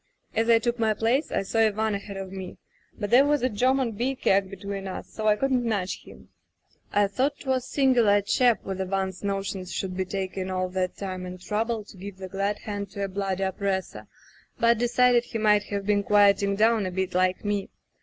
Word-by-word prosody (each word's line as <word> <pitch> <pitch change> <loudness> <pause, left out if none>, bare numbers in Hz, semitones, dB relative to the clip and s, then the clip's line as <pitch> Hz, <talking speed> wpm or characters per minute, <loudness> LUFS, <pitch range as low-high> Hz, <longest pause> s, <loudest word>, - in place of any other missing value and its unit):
As 225 +1 +1
I 230 - +7
took 240 +1 -1
my 220 -2 +2
place 235 +8 +1
I - - 0
saw 225 +4 -1
Ivan 220 0 +2
ahead 200 0 -5
of 190 -1 -6
me, 190 -2 -7 0.4
but 205 -2 -4
there 250 +3 +7
was 290 -2 +1
a 255 - +3
German 255 +3 +1
beer 245 +5 -1
keg 195 -5 +2
between 195 0 -6
us, 190 - -6
so 215 -1 -3
I 210 - +5
couldn't 260 +1 +1
nudge 205 -5 -2
him. - - -15 0.6
I 205 0 +3
thought 265 +8 -1
'twas 260 -2 -1
singular 250 -7 +3
a 205 - +3
chap 240 +3 +2
with 190 -1 -4
Ivan's 190 0 -2
notions 195 -2 -3
should 185 -1 -3
be 190 0 -1
taking 190 0 -4
all 185 0 -1
that 185 0 -2
time 185 -2 -5
and 180 0 -8
trouble 220 +3 -2
to 205 - -15
give 195 +1 -8
the 190 0 -7
glad 200 +2 -1
hand 205 -2 -5
to 200 - -3
a - - 0
bloody 195 0 -2
oppressor, 190 0 -2 0.5
but 235 -1 +4
decided 245 0 +3
he 230 - -4
might 210 -1 +3
have 200 -1 -4
been 205 0 +2
quieting 200 -1 +4
down 220 -1 +3
a - - -4
bit 190 0 -2
like 185 0 +1
njie. 205 -2 -1
205 Hz, 210 wpm, -26 LUFS, 190-230 Hz, 0.6 s, I